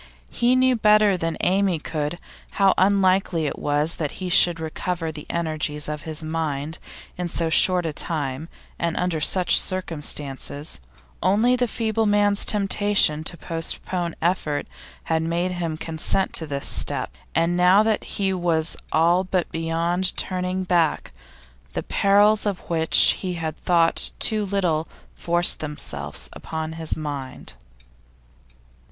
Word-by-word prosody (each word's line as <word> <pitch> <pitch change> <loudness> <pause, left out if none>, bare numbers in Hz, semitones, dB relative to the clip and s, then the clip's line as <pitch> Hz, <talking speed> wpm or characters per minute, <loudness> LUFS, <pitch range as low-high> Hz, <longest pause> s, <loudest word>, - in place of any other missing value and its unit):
He 245 +1 +2
knew 255 0 +3
better 210 -2 +4
than 165 -2 -3
Amy 190 -1 +1
could 150 +1 -4 0.4
how 195 -1 +3
unlikely 190 -4 +2
it 145 - -4
was 150 +2 -1
that 150 -3 -3
he 185 -1 -5
should 175 -1 +4
recover 165 +1 -4
the 150 -1 -10
energies 155 -3 -3
of 150 -1 -5
his 155 0 -3
mind 155 -1 -3 0.4
in 180 - -2
so 165 -1 -1
short 180 +1 +4
a 160 - -3
time 145 -1 -3 0.3
and 170 -1 -2
under 180 -3 -1
such 180 +4 +3
circumstances; 150 -5 -3 0.4
only 215 +7 +3
the 250 0 0
feeble 220 -1 -1
man's 205 0 +3
temptation 200 -6 +2
to 170 - -2
postpone 170 +1 -3
effort 165 -4 -1 0.4
had 160 0 0
made 170 +3 -1
him 170 -3 -3
consent 165 +4 -1
to 160 - -1
this 140 -1 -3
step, - - +1 0.2
and 165 +1 +1
now 180 +4 +5
that 220 -1 0
he 195 -1 0
was 170 -3 0 0.2
all 170 +3 +3
but 185 -2 -2
beyond 165 +3 -1
turning 185 0 -1
back, 175 -4 0 0.6
the - - -3
perils 205 +2 +3
of 195 -3 -5
which 160 -1 +6
he 185 -2 -4
had 160 -2 -4
thought 170 -1 +2
too 215 -2 0
little 175 -5 0 0.3
forced 175 +1 +2
themselves 75 - -6
upon 160 0 -6
his 160 -1 -1
mind. 140 - -6
170 Hz, 140 wpm, -23 LUFS, 160-190 Hz, 0.6 s, which